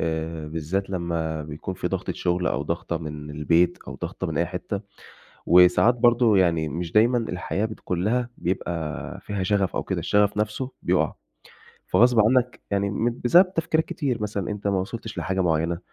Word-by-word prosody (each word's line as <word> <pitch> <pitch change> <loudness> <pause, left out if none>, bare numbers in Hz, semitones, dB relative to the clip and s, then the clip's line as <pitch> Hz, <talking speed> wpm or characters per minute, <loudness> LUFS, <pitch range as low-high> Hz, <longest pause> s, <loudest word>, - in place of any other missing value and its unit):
آآ 80 -1 -3
بالذات 85 +5 -3
لمّا 85 -3 -2
بيكون 75 +5 -6
فيه - - -3
ضغطة - - -2
شُغل 90 0 -1
أو - - 0
ضغطة 85 - -3
من 75 -2 -7
البيت 85 +4 +2
أو - - -6
ضغطة - - -4
من - - -3
أي 85 - +2
حتّة. 90 +3 -4 0.7
وساعات 90 +7 +6
برضه 120 -3 +4
يعني 85 -4 +2
مش 85 +3 -4
دايمًا 120 +3 +4
الحياة 100 -1 -2
بتكون 90 -5 -4
لها 120 +3 0
بيبقى 85 -3 -3
فيها 100 -2 -3
شَغَف 100 -1 +1
أو - - -1
كدا، - - -2
الشَغَف 105 0 +2
نَفْسه 110 +5 -2
بيُقَع. - - +1 0.7
فغصب 120 0 +4
عنّك 125 +3 +2
يعني 100 0 +1
م 115 +4 -1
بسبب 180 +9 +5
تفكيرات 160 -1 +1
كتير. 130 -8 -2
مثلًا 100 -3 -3
أنت 105 0 -4
ما 95 -2 +1
وصلتش 110 +3 -6
لحاجة 95 0 -1
معيّنة، 85 0 0
95 Hz, 170 wpm, -24 LUFS, 85-110 Hz, 0.7 s, وساعات